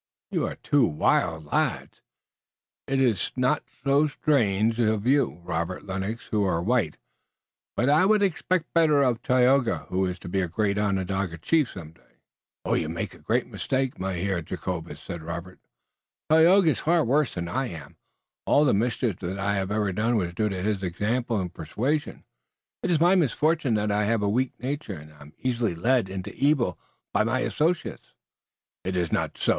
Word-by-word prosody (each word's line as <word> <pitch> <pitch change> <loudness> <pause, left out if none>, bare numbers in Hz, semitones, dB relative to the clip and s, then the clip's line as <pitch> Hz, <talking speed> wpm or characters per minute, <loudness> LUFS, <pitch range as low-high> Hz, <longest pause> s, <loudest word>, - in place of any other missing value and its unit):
You - - 0
are - - -5
two 145 -2 +2
wild 80 0 +1
lads. 75 - -2 0.9
It 135 0 0
iss 115 -8 +1
not 130 +3 +1 0.2
so 140 +2 +3
strange 115 -7 +1
uf 110 -2 +1
you, 125 - +2
Robert 85 +2 -3
Lennox, 95 +4 -4
who 105 -1 +2
are 90 -4 +1
white, 100 -4 0 0.8
but 125 - +2
I 150 +6 +5
would 210 0 +4
expect 185 -2 -1
better 155 -4 +4
uf 125 -4 +1
Tayoga, 125 0 +2
who 95 +1 +1
is 90 0 -4
to - - -11
be 95 +2 0
a 90 - -1
great 100 +3 0
Onondaga 95 -3 -1
chief 150 - +1
some 80 -5 -9
day." 80 - -29 0.5
"You - - 0
make - - -4
a - - -15
great - - 0
mistake, 130 -1 -2
Mynheer 95 -1 -1
Jacobus," 80 -2 -5
said 85 0 -7
Robert. 85 +3 -7 0.7
"Tayoga 165 +2 +6
is - - -2
far 165 0 +2
worse 140 +3 +1
than 85 -1 -3
I 130 +9 -1
am. 85 -8 -9 0.5
All 150 - +5
the 135 - +3
mischief 110 -1 0
that 95 +1 -4
I 100 +1 0
have 95 -1 -1
ever 105 -2 0
done 115 +5 +1
was 85 -4 -2
due 105 +4 0
to 95 -2 -4
his 105 -2 0
example 110 +6 -1
and 90 -2 -4
persuasion. 130 - -2 0.6
It - - -2
is 170 -3 +3
my 175 +3 +5
misfortune 155 - +2
that 105 0 0
I 105 0 +1
have 110 0 +1
a - - +1
weak 125 +5 0
nature, 140 -3 -4
and 75 +1 -13
I 75 - -19
am 75 +2 -13
easily 120 -7 -1
led 120 +3 +1
into 95 -1 -6
evil 135 - +1 0.3
by 110 - +3
my 125 +4 0
associates." 165 +6 -1 0.7
"It 95 0 -2
iss 85 -2 -1
not - - -1
so. - - -1
110 Hz, 180 wpm, -26 LUFS, 95-135 Hz, 0.9 s, Tayoga